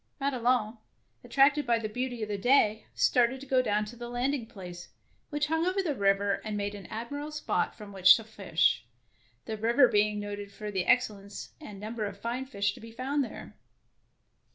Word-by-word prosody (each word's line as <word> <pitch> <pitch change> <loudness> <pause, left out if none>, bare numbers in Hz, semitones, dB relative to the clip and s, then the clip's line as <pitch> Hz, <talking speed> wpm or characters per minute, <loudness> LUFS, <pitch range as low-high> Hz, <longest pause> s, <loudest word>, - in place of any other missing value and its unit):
Madelon, 245 -4 +1 0.4
attracted 285 +1 +3
by 235 -1 +4
the 225 -1 -3
beauty 245 +1 -3
of - - -3
the 210 - -2
day, 220 -2 +3
started 245 +1 +3
to 275 - -10
go 260 -1 +3
down 210 -3 0
to 220 +3 -10
the 240 0 -7
landing 245 0 -1
place, 180 -5 -9 0.4
which 295 -1 0
hung 320 +2 0
over 375 +2 +1
the 315 -5 0
river 200 -3 +1
and 215 -1 -3
made 205 0 -2
an 200 -3 -9
admirable 285 +7 -5
spot 300 0 -1
from 210 -2 -10
which 185 -1 +8
to 225 - -4
fish, 185 - +1 0.6
the 220 - -4
river 235 +5 +5
being 210 -1 +2
noted 205 -1 -6
for 210 +1 -6
the 190 -3 -1
ex 250 0 +5
cellence 200 -1 -10
and 200 -2 -9
number 215 +1 -4
of 200 -1 -8
fine 240 +5 -3
fish 200 -6 -1
to 255 - -12
be 230 0 -11
found 270 +5 -1
there. 245 - -9
225 Hz, 195 wpm, -29 LUFS, 205-255 Hz, 0.6 s, which